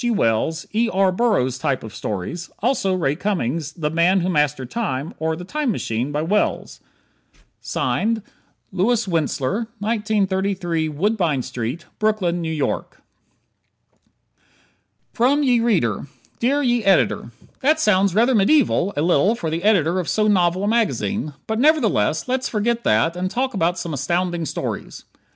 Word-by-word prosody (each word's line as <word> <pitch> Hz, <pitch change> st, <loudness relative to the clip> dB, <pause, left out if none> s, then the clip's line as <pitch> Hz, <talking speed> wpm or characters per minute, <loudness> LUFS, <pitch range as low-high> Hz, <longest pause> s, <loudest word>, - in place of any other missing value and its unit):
G. 240 Hz, -, 0 dB
Wells, 160 Hz, -, 0 dB
E. 230 Hz, +2 st, +2 dB
R. 190 Hz, 0 st, +3 dB
Burroughs 180 Hz, -, +1 dB
type 130 Hz, 0 st, -1 dB
of 110 Hz, -2 st, -9 dB
stories, 110 Hz, -, -5 dB
also 205 Hz, -5 st, 0 dB
Ray 150 Hz, -6 st, 0 dB
Cummings' 165 Hz, -, -2 dB
"The 150 Hz, -4 st, -3 dB
Man 175 Hz, +3 st, +3 dB
who 180 Hz, -, -1 dB
Mastered 150 Hz, -6 st, 0 dB
Time," 160 Hz, -, -3 dB
or 160 Hz, 0 st, -1 dB
"The 175 Hz, -, -8 dB
Time 300 Hz, +5 st, -2 dB
Machine," 120 Hz, -, -2 dB
by 150 Hz, +1 st, -1 dB
Wells? 205 Hz, +6 st, -1 dB, 1.0 s
Louis 225 Hz, +1 st, +1 dB, 0.9 s
Wentzler, 170 Hz, -, -1 dB
1933 195 Hz, -6 st, 0 dB
Woodbine 165 Hz, -, 0 dB
St., 125 Hz, +6 st, -5 dB
Brooklyn, 190 Hz, -6 st, 0 dB
N. 160 Hz, -1 st, -3 dB
Y. -, -, 0 dB, 2.3 s
From 270 Hz, +5 st, +2 dB
Ye 250 Hz, -3 st, +3 dB
Reader 165 Hz, -, 0 dB, 0.3 s
Dear 280 Hz, +5 st, +1 dB
Ye 240 Hz, -3 st, +1 dB
Ed.: 195 Hz, 0 st, +2 dB, 0.3 s
That 305 Hz, +4 st, +2 dB
sounds 195 Hz, -, +3 dB
rather 240 Hz, +4 st, +4 dB
medieval 205 Hz, -, +3 dB
a 145 Hz, -, +1 dB
little 180 Hz, +6 st, +3 dB
for 165 Hz, -9 st, -4 dB
the 165 Hz, +1 st, -2 dB
editor 185 Hz, -4 st, +3 dB
of 175 Hz, -, -3 dB
so 215 Hz, -1 st, +2 dB
novel 185 Hz, -2 st, +2 dB
a -, -, 0 dB
magazine, 215 Hz, -6 st, 0 dB
but 220 Hz, 0 st, -2 dB
nevertheless 225 Hz, -, +2 dB
let's 260 Hz, +1 st, -1 dB
forget 235 Hz, +2 st, -1 dB
that 115 Hz, +11 st, +2 dB
and 185 Hz, +1 st, -2 dB
talk 255 Hz, +4 st, -1 dB
about 175 Hz, -2 st, 0 dB
some 170 Hz, -2 st, -4 dB
astounding 170 Hz, +4 st, -1 dB
stories. -, -, -5 dB
185 Hz, 145 wpm, -21 LUFS, 155-220 Hz, 2.3 s, rather